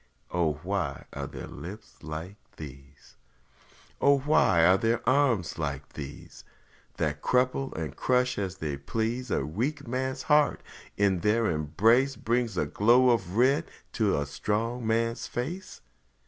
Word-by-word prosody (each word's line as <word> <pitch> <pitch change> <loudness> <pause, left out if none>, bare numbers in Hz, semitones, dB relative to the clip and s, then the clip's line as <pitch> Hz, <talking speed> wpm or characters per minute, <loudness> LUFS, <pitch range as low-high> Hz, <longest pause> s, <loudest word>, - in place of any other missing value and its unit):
O 85 -3 +1
why - - -2
are 70 -1 -4
there 70 -3 -8
lips 100 +8 -10
like 80 +6 -6 0.2
these? 70 -1 -12 0.8
O 140 0 +5
why 130 - +4
are 95 +2 +6
there 115 +1 0
arms 125 - +2
like 70 -3 -3
these? 70 -4 -9 0.5
That 75 -3 -1
crumple 130 +2 +1
and 80 -4 -4
crush 125 -2 +1
as 95 -2 -3
they 75 -5 -3
please 115 - -2
A 65 - 0
weak 130 - -3
man's 130 +2 -2
heart, 150 0 +3 0.3
and 100 -2 +3
in - - -5
their 110 +3 +2
embrace 110 - +2
Bring 120 +1 0
a - - +2
glow 120 +4 +4
of 100 -4 -1
red 135 +7 +3 0.2
to 105 -4 +1
a 70 - -1
strong 110 - -2
man's 115 +1 0
face? 165 +11 -5
110 Hz, 145 wpm, -28 LUFS, 80-125 Hz, 0.8 s, are